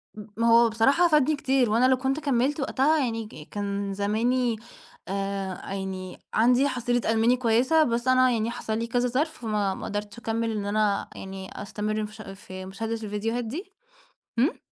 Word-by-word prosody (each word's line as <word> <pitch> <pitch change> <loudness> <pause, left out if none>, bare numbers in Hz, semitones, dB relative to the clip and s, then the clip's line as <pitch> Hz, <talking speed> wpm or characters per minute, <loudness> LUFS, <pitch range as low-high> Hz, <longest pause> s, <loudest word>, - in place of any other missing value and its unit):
م 210 -1 -8
ما 230 - +2
هو 230 0 +6
بصراحة 270 +10 +4
فادني 305 -2 +3
كتير 265 -3 +2
وأنا 230 +4 +3
لو 260 - +4
كنت 265 +3 -1
كمّلت 280 0 +1
وقتها 290 +3 +2
يعني 225 -2 -3
ك 155 -6 -12
كان 200 -1 -3
زماني 230 +4 +1 0.5
آآ 195 -1 -3
يعني 190 -1 -5 0.2
عندي 250 +5 +4
حصيلة 245 -2 0
ألماني 230 +3 +3
كويسة، 255 +7 +3
بس 240 -2 -1
أنا 255 0 +5
يعني 230 0 0
حصل 220 -2 -3
لي 230 - -2
كذا 245 +1 +1
ظرف 270 +6 +1
فما 210 -4 0
ما - - -7
قدرتش 205 0 -4
أكمل 225 0 -1
إن 210 -2 -3
أنا 205 0 +1
يعني 190 0 -7
أستمر 215 +1 -2
في 210 - -11
ش 220 - -10
في 195 -2 -9
مشاهدة 220 +4 -4
الفيديوهات 225 +2 -2
دي. 345 - -6 0.7
امم. 270 +9 +2
225 Hz, 175 wpm, -26 LUFS, 205-255 Hz, 0.7 s, هو